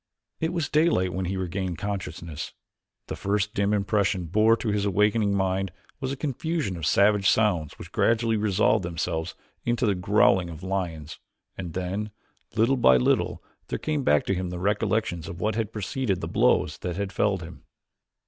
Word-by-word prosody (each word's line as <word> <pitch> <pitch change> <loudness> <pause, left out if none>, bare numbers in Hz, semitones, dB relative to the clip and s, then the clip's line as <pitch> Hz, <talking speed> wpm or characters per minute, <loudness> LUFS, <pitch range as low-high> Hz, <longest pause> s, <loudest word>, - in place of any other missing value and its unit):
It 160 +1 0
was 170 -5 -1
daylight 150 - +2
when 95 +1 -2
he 95 +2 -2
regained 95 -1 -3
consciousness. 85 -6 -5 0.5
The - - -5
first 105 +1 -1
dim 100 0 +1
impression 100 -2 +1
borne 110 +7 +4
to 115 - -3
his 105 -1 0
awakening 105 +1 +2
mind 95 -1 0 0.3
was 130 0 -2
a - - -2
confusion 150 - -2
of 80 -3 -3
savage 100 +1 +4
sounds 90 -9 +1
which - - -10
gradually 115 0 +2
resolved 105 0 +2
themselves 85 -1 -3 0.3
into 120 +1 +1
the 105 - +3
growling 95 -1 +3
of 85 +1 -9
lions, 85 -6 -3 0.4
and 90 -4 -6
then, 95 +4 -3 0.5
little 115 +5 +3
by 65 - +6
little, 60 - +1 0.2
there - - -2
came 155 -2 -1
back 75 - +3
to - - +1
him 90 -1 -2
the 90 - -5
recollections 100 -3 0
of 85 +1 -7
what 105 +4 0
had 110 0 -2
preceded 105 -1 -2
the - - -4
blow - - +3
that 90 -2 -5
had 100 0 -3
felled 100 -4 +1
him. 85 -5 -10
100 Hz, 175 wpm, -26 LUFS, 90-110 Hz, 0.5 s, by